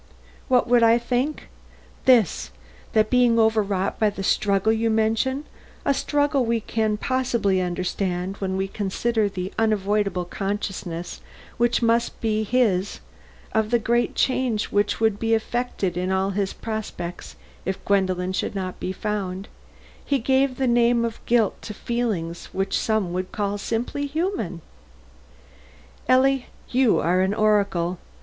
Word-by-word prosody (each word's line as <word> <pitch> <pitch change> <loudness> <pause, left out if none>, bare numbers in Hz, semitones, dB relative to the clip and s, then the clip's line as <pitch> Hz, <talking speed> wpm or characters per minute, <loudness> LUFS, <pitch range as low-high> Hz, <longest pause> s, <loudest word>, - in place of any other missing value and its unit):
"What 250 -1 +3
would 240 0 +4
I 230 0 +6
think? 250 +5 -2 0.6
This: 235 - +4 0.4
That 215 0 +3
being 245 -2 +4
overwrought 210 -4 +1
by 215 - +4
the 200 -1 -6
struggle 200 +1 +2
you 225 +1 +1
mention 225 +5 +1 0.4
(a 280 - +3
struggle 285 0 +1
we 230 0 +1
can 220 -1 -1
possibly 235 -6 0
understand 180 +1 -2
when 190 -1 -2
we 190 0 -1
consider 210 +2 -1
the 185 -1 -5
unavoidable 205 -4 +1
consciousness 185 -3 -4 0.4
which 240 +1 +2
must 235 +1 +1
be 220 -1 0
his 205 -5 +1 0.5
of 220 -1 +1
the 240 - +4
great 235 +1 0
change 255 -5 0
which 205 0 +1
would 220 -2 +2
be 225 0 +2
effected 225 -5 -2
in 180 +1 -1
all 190 +1 +1
his 195 0 -1
prospects 210 -6 -6 0.3
if 190 0 -4
Gwendolen 185 -2 +1
should 190 - -2
not 185 -2 -4
be 185 - -3
found), 195 -2 -4 0.5
he 280 - +1
gave 265 +1 +1
the 265 - 0
name 235 -1 +3
of 230 -1 -6
guilt 230 -3 +2
to 210 - -7
feelings 205 -10 -2
which 195 +1 -1
some 215 -5 0
would 185 +1 -3
call 205 -1 -2
simply 240 +7 -2
human." 305 - -2 1.5
"Ellie, 260 0 +4 0.2
you 255 -2 +4
are 180 +2 +2
an 190 +2 +1
oracle." 200 -5 +1
215 Hz, 140 wpm, -24 LUFS, 190-240 Hz, 1.5 s, I